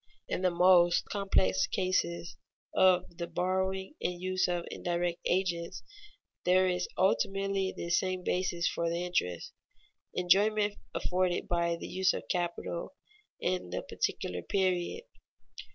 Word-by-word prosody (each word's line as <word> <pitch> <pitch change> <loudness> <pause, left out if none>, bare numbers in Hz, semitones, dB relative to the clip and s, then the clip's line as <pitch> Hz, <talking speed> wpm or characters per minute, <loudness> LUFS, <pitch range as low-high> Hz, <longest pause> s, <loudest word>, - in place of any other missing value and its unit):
In - - -2
the 185 - +3
most 175 0 +5
complex 95 - +1
cases 175 -2 -1 0.4
of 180 -2 +3
the 170 - -2
borrowing 190 +4 -1
and 175 -1 -2
use 185 +1 0
of 175 -1 -1
indirect 175 0 -2
agents, 175 -2 -1 0.6
there 185 +1 +4
is 180 0 0
ultimately 195 0 +1
this 170 0 0
same 185 -1 -2
basis 180 -1 0
for 170 0 -1
the 170 +1 -2
interest: 90 - -2 0.6
enjoyment 205 +4 +3 0.2
afforded 180 -1 0
by 170 -1 +1
the 170 - -8
use 190 0 +2
of - - -6
capital 175 +5 -3 0.4
in 180 - -1
the 90 - -3
particular 90 0 -2
period. 185 - 0
180 Hz, 125 wpm, -31 LUFS, 170-190 Hz, 0.6 s, most